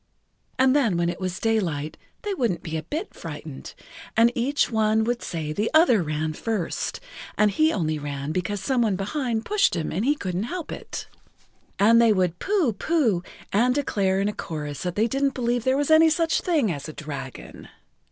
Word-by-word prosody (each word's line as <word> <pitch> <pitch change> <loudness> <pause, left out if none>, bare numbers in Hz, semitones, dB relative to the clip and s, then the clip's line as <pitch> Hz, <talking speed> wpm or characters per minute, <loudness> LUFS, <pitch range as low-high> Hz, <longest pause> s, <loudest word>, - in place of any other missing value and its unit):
And 260 +1 +4
then 230 -11 +2
when 170 0 +1
it 175 - -4
was 185 -1 -3
daylight 170 -10 -1 0.3
they 415 -2 -2
wouldn't 230 - -1
be 160 -2 -4
a 160 - -1
bit 310 - -5
frightened, 150 -3 -8 0.4
and 230 +1 +6
each 260 +4 +1
one 220 0 +2
would 240 +1 -1
say 155 -3 -4
the 210 +6 0
other 315 - +6
ran 155 0 -2
first, 210 0 -3 0.4
and 210 -1 +4
he 310 +9 +3
only 155 - -1
ran 145 0 -4
because 185 +4 -2
some 250 +4 +1
one 215 -4 +2
behind 225 +3 -2
pushed 415 - +2
him 165 -3 -2
and 185 +7 -1
he 290 +4 +3
couldn't 185 -5 -3
help 355 -4 -5
it. - - -6 0.7
And 230 +3 +6
they 230 -2 +5
would 180 -3 0
pooh! 370 - +1
pooh! 235 - +1 0.3
and 245 +5 +3
declare 195 -9 +1
in 200 - +1
a 210 - -1
chorus 150 -6 -5
they 185 +5 0
didn't 275 +2 0
believe 240 -2 0
there 260 +1 +3
was 290 +2 0
any 320 +1 +7
such 330 0 +1
thing 300 - +1
as 145 -1 -5
a - - -8
dragon. 145 -4 -8
215 Hz, 190 wpm, -24 LUFS, 170-260 Hz, 0.7 s, any